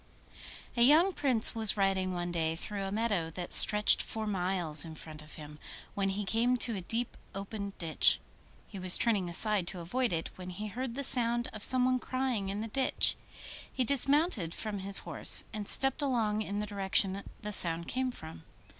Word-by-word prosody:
A 240 - -1
young 315 +10 +5
Prince 255 -9 +1
was 220 -2 0
riding 190 -1 0
one 175 -1 -4
day 160 -1 -2
through 200 +4 -6
a 195 - -5
meadow 205 -6 -2
that 180 -1 -4
stretched 210 0 +5
for 220 -1 -5
miles 180 -6 -1
in 160 -1 -10
front 155 0 -9
of 155 - -12
him, 150 -1 -12 0.3
when 195 -1 -2
he 200 +1 -3
came 235 +5 +1
to 235 -2 -2
a 190 - -5
deep 230 +6 -3 0.2
open 200 0 -6
ditch. 165 -2 +4 0.5
He 200 - -10
was 185 -1 +5
turning 205 -7 0
aside 200 +1 +3
to 180 - -6
avoid 240 +9 -2
it, 165 -1 -3
when 180 0 -8
he 210 +4 -7
heard 245 +3 -6
the 280 - -4
sound 240 -2 -1
of 215 - -8
someone 255 +2 +4
crying 255 -7 -3
in 200 +2 -4
the 225 - -5
ditch. 265 +4 0 0.6
He 260 - -1
dismounted 275 - +1
from 210 -2 -5
his 195 +1 +1
horse, - - +6
and 210 -2 -6
stepped 270 +2 +3
along 225 -6 -1
in 205 -1 -5
the - - -3
direction 195 -1 -1 0.2
the 210 - -5
sound 170 -4 +3
came 260 +1 -2
from. 160 -10 -11
205 Hz, 190 wpm, -30 LUFS, 180-240 Hz, 0.6 s, horse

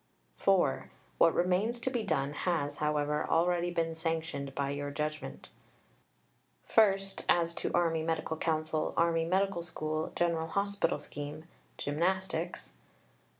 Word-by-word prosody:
(4) 175 - +2 0.3
What 165 - +5
remains 190 +7 +1
to 260 - -1
be 245 -3 0
done 145 -9 0
has, 150 -3 -1
however, 150 0 0
already 175 +1 +2
been 165 -1 -1
sanctioned 160 -4 -3
by 140 -1 -1
your 145 0 -3
judgment: 150 +1 -4 1.3
(i.) 215 -4 +7 0.3
as 170 -1 +3
to - - -3
Army 165 -2 +2
Medical 160 0 -1
Council, 155 -1 -1
Army 165 -1 +3
Medical 190 +1 +1
School, 155 -2 -3
General 165 -2 +1
Hospital 200 +3 0
scheme, 145 +2 -7 0.3
Gymnastics; 175 +2 -1
(ii.) - - -32
165 Hz, 125 wpm, -31 LUFS, 150-175 Hz, 1.3 s, i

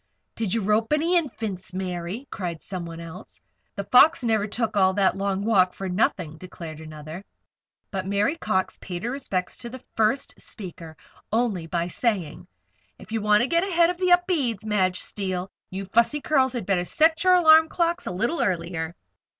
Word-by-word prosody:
"Did 220 -5 -2
you 230 - +1
rope 215 +6 +2
any 330 +4 +2
Infants, 215 - -2
Mary?" 185 +6 -4
cried 175 -5 -4
somebody 170 -3 -7
else. 160 - -11 0.4
"'The 200 - -3
Fox' 265 - +6
never 220 -3 +1
took 220 0 -2
all 190 -1 +4
that 195 -2 +3
long 195 0 -1
walk 185 -5 +4
for 195 - -5
nothing," 180 -4 -1
declared 165 -4 -9
another. 155 +3 -9 0.7
But 190 -3 -3
Mary 200 +9 +1
Cox 190 - -1
paid 175 -1 -6
her 240 - -1
respects 195 -10 -3
to 240 - -6
the 260 +1 -10
first 225 +5 +1
speaker 170 -5 -9 0.3
only, 215 -7 0
by 170 0 -1
saying: 180 -4 -2 0.5
"If - - -14
you 225 -1 -1
want 210 0 +4
to - - 0
get 335 +5 +2
ahead 345 -3 +3
of 360 - -8
the 365 0 +1
Upedes, 320 - +2
Madge 190 -4 +1
Steele, 185 -2 -4 0.2
you 195 +1 -5
Fussy 235 +8 +2
Curls 265 -3 +2
had 240 -6 -3
better 185 -2 +1
set 320 - +2
your 365 0 +6
alarm 320 -2 +7
clocks 345 +1 0
a - - -2
little 235 - -1
earlier." 170 -2 -2
205 Hz, 175 wpm, -25 LUFS, 180-260 Hz, 0.7 s, alarm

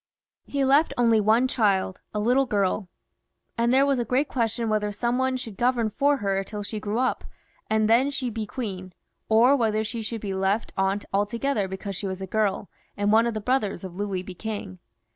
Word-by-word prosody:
He 280 -1 0
left 285 +4 +3
only 230 -3 +4
one 225 +5 +3
child, 195 -6 +1
a 210 - -2
little 250 +5 +2
girl; 200 -2 0 0.7
and 235 0 +1
there 270 +2 +5
was 275 -2 +1
a - - +1
great 255 +5 +1
question 230 -2 -1
whether 210 -1 0
some 240 +4 -1
one 260 0 +1
should 225 -6 -8
govern 240 -3 +1
for 285 +6 +2
her 195 -4 -1
till 205 +1 -6
she 215 +1 -5
grew 210 +1 -3
up, 255 +1 0 0.5
and 215 0 +2
then 240 +5 +4
she 270 -3 -3
be 220 -1 -4
queen, 190 -7 -5 0.4
or 235 +5 +6
whether 220 -4 +1
she 225 +1 -4
should 225 0 -5
be 200 -2 -3
left 195 +3 0
out 195 +1 0
altogether 210 +2 0
because 190 +1 -6
she 195 - -4
was 190 0 -4
a 190 - -4
girl, 205 0 0 0.3
and 205 0 +1
one 225 +2 +5
of 235 - -2
the 215 - -3
brothers 215 -4 0
of 185 -2 -7
Louis 195 -2 -3
be 185 - -8
king. 200 -2 -6
220 Hz, 205 wpm, -25 LUFS, 200-245 Hz, 0.7 s, or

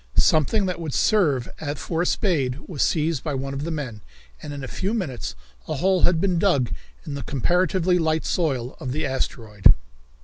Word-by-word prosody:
Something 175 +7 +3
that 180 -2 -2
would 155 -4 -3
serve 150 - +3 0.3
for 165 +3 -2
a 175 - +1
spade 145 - +1
was 155 -7 -4
seized 155 -3 +1
by 150 -3 -2
one 135 +1 -3
of 140 +2 -3
the - - -2
men, 135 -10 -4 0.4
and - - -7
in 140 -1 -6
a - - -4
few 195 - -2
minutes 150 - -3 0.3
a 155 - -2
hole 185 +4 +2
had 175 -2 +4
been 180 -2 +2
dug 145 - +2 0.3
in 145 - -5
the 140 - -4
comparatively 180 - +2
light 160 -1 +1
soil 135 -8 -1
of 125 - -3
the 155 +1 -1
asteroid. 110 -6 +2
155 Hz, 190 wpm, -24 LUFS, 135-180 Hz, 0.4 s, had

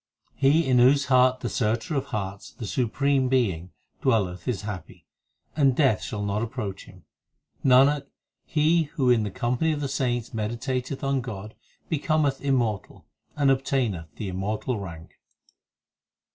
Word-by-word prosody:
He 145 +4 +3
in 130 -2 +3
whose 140 +3 +5
heart 130 0 +4
the - - -2
Searcher 115 +5 -1
of 135 - 0
hearts, 100 -1 -5
The 120 - -7
Supreme 130 +4 +1
Being, 95 -10 0 0.3
dwelleth 105 -8 0
is 105 -6 -2
happy, 105 -5 -7 0.5
And 135 -4 +3
Death 135 -7 +3
shall 105 -2 -4
not 100 +1 -1
approach 110 -5 -5
him. 90 -2 -16 0.6
Nanak, 140 +2 +5 0.4
he 160 +2 +2
who 130 -4 +3
in 120 -2 +4
the 105 - -2
company 120 +10 0
of 150 - -3
the 145 - -2
saints 125 -3 -2
meditateth 125 +5 -3
on 135 -1 +1
God 110 -3 -7 0.3
Becometh 155 -3 0
immortal, 120 -7 -1 0.3
and 140 -2 +3
obtaineth 120 - -1
the 105 - -5
immortal 105 +5 -2
rank. 85 -4 -9
125 Hz, 145 wpm, -25 LUFS, 105-135 Hz, 0.6 s, whose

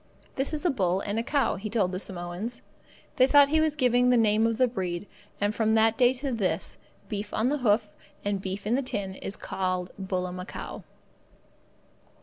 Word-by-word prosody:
"This 270 +1 0
is 310 +2 -4
a 345 - +4
bull 190 -6 +1
and 215 +3 -2
cow," 285 -2 +1
said - - -10
he 215 - -4
to 215 -2 +2
the 185 0 -4
Samoans. 185 +5 -4 0.5
They 255 - +6
thought 285 0 +6
he 315 +1 +3
was 310 -1 +1
giving 250 -3 +3
the 250 - +5
name 220 0 +4
of 230 -1 -1
the 255 0 +4
breed, 185 -5 -3 0.3
and 205 +1 +1
from 220 0 +2
that 225 0 +4
day 245 0 +5
to 265 +1 -4
this, 210 -6 -1 0.3
beef 205 -1 -4
on 225 +4 +2
the 295 +1 0
hoof 210 -3 +2 0.3
and 200 -1 0
beef 195 +1 -5
in 215 - +1
the 265 - +2
tin 205 -7 -3
is 195 +1 -4
called 185 -2 -3
bullamacow. 180 -1 -4
215 Hz, 190 wpm, -27 LUFS, 190-250 Hz, 0.5 s, They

